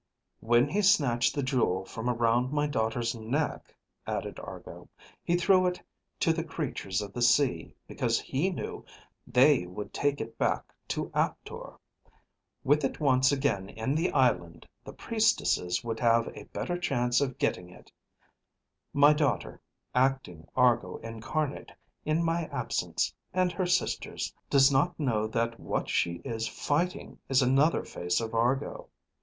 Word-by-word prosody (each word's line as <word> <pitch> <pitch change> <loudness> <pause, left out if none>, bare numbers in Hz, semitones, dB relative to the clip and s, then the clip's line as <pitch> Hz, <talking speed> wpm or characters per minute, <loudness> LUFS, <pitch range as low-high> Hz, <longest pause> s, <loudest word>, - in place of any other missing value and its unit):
"When 120 +3 +3
he 200 +8 0
snatched 140 - +3
the 140 - -1
jewel 120 -8 0
from 115 +2 -4
around 120 +1 +1
my 145 0 +1
daughter's 115 -4 -1
neck," 120 +7 -3 0.3
added - - -4
Argo, - - -10 0.3
"he 175 - +1
threw 185 +1 +4
it 180 0 -2 0.4
to 165 - +3
the 165 0 -2
creatures 125 - -3
of 100 -1 -9
the 120 - -4
sea 120 - +2
because - - 0
he 150 +8 -1
knew 185 - -5 0.4
they 130 -5 +4
would 95 +4 -7
take 145 0 0
it 115 - -7
back - - -1
to - - -3
Aptor. - - -3 0.9
With 145 +2 +3
it 135 - -2
once 130 -3 +4
again 135 -9 0
in 110 +6 -2
the 165 +4 0
island, 100 - +1 0.2
the - - -9
priestesses 90 0 +1
would 115 -1 -4
have 115 -1 +3
a - - -9
better 175 0 -4
chance 125 -6 +1
of 130 -3 -1
getting 90 0 -1
it; 90 - -17 1.0
my 145 +1 +6
daughter, 150 -3 -1 0.3
acting 125 -11 0
Argo 120 -2 +3
Incarnate 120 +6 -4 0.3
in 155 +2 +1
my 165 0 0
absence 125 -5 -2 0.2
and 185 -1 +2
her 185 0 -2
sister's, 180 +1 -1 0.2
does 135 0 +5
not 160 +6 +1
know 110 -7 0
that 115 +1 -2
what - - -3
she 85 - +1
is 115 -3 -2
fighting 175 +5 -2
is 135 0 +4
another 135 +6 +3
face 90 0 -2
of 115 -1 -4
Argo. 120 +4 -1
130 Hz, 150 wpm, -29 LUFS, 115-150 Hz, 1.0 s, my